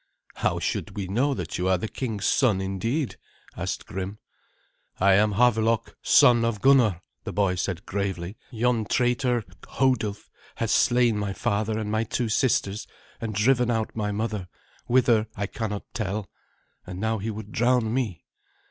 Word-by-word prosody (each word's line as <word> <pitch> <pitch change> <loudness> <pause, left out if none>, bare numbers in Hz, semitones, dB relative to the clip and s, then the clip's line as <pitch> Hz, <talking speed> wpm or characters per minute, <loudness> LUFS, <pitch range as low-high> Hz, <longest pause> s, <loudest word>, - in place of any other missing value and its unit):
"How - - 0
should - - -3
we 100 - -2
know 130 +9 +1
that 90 -3 -4
you 90 - 0
are 95 -1 +3
the 100 - -3
king's 110 -4 -4
son 120 -9 +3
indeed?" 95 - -2 0.4
asked - - -4
Grim. 95 +2 -5 0.8
"I 100 +1 +5
am 105 +2 +4
Havelok, 115 0 +2
son 120 -2 +6
of 115 -3 0
Gunnar," 115 -9 +4 0.2
the - - -5
boy 100 -3 +1
said 90 0 -3
gravely. 95 -1 -3
"Yon 120 -2 0
traitor, 125 0 +1 0.3
Hodulf, 110 -6 0 0.3
has - - -1
slain 120 -3 +3
my 100 -1 -2
father, 105 +2 -1
and 105 -1 -3
my 110 +1 +1
two 115 +1 -2
sisters, 110 -3 +1 0.3
and 110 -2 -4
driven 125 +3 +3
out 110 -2 -1
my 105 -2 -1
mother, 105 -2 -3 0.4
whither 120 -3 +3
I 100 - -2
cannot 105 0 -4
tell, 105 -2 -3 0.6
and 90 - -6
now 110 +1 0
he 105 +3 -3
would 105 -1 -7
drown 120 -1 +2
me." 115 - -2
110 Hz, 155 wpm, -25 LUFS, 100-120 Hz, 0.8 s, son